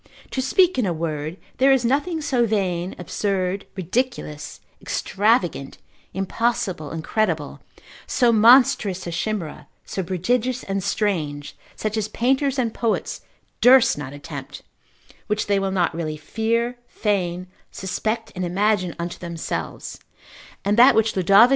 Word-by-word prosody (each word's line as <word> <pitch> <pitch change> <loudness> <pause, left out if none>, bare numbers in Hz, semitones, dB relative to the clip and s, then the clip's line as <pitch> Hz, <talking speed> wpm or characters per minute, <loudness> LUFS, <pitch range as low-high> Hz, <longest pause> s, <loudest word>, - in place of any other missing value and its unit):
To 260 - -1
speak 350 +4 +3
in 225 - +1
a 175 - 0
word, 155 0 -3 0.2
there 270 +1 +5
is 265 -3 +3
nothing 305 +6 0
so 245 -5 +1
vain, 185 -4 -1
absurd, 190 +1 -2
ridiculous, 190 - -3 0.2
extravagant, 195 - 0 0.3
impossible, 190 -4 -1
incredible, 165 -1 -1 0.5
so 245 -2 +3
monstrous 220 -4 +5
a 170 - -4
chimera, 175 -2 -3 0.2
so 190 - -3
prodigious 235 +8 -1
and 195 -1 -2
strange, 155 -10 -2 0.2
such 215 0 -3
as 215 -1 0
painters 270 +4 +1
and 235 -4 0
poets 230 -2 -1 0.4
durst 255 0 +7
not 145 -3 -6
attempt, 145 0 -8 0.6
which 210 -1 0
they 200 -1 +2
will 195 0 -1
not 185 -3 +1
really 155 -2 -3
fear, 230 +8 -1
feign, 185 -4 -1 0.3
suspect 220 +4 -3
and 185 - -3
imagine 185 0 +1
unto 170 0 -5
themselves: 170 -2 -5 0.7
and 205 +2 +2
that 250 +3 +8
which 220 0 +2
Lod. 195 +6 +6
200 Hz, 130 wpm, -23 LUFS, 175-235 Hz, 0.7 s, that